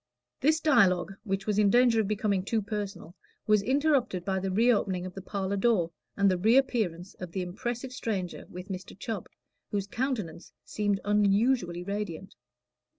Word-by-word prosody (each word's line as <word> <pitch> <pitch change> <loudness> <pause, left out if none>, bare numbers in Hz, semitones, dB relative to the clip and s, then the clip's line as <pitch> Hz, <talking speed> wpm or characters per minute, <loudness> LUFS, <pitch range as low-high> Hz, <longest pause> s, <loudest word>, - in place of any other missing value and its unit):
This 310 +3 +3
dialogue, 200 - +3
which 195 -3 -2
was 210 -1 +1
in 205 -1 +5
danger 240 0 +5
of 205 - -2
becoming 205 -2 0
too 220 +3 0
personal, 200 -5 -5 0.3
was 210 -1 +4
interrupted 260 - +1
by 190 -1 0
the 190 +1 -2
reopening 200 -3 +2
of 185 - -7
the 195 - -7
parlor 195 0 -2
door, 195 -6 +2 0.3
and 200 -1 +4
the 185 -2 +2
reappearance 215 -5 +2
of 180 -2 -7
the 190 - -1
impressive 240 +8 -4
stranger 195 -8 -4
with 180 +2 -9
Mr. 185 -1 -7
Chubb, 205 -2 -5 0.4
whose 200 -2 -1
countenance 215 - -3
seemed 205 -2 0
unusually 205 -2 +2
radiant. 195 -2 -4
200 Hz, 155 wpm, -29 LUFS, 185-230 Hz, 0.4 s, in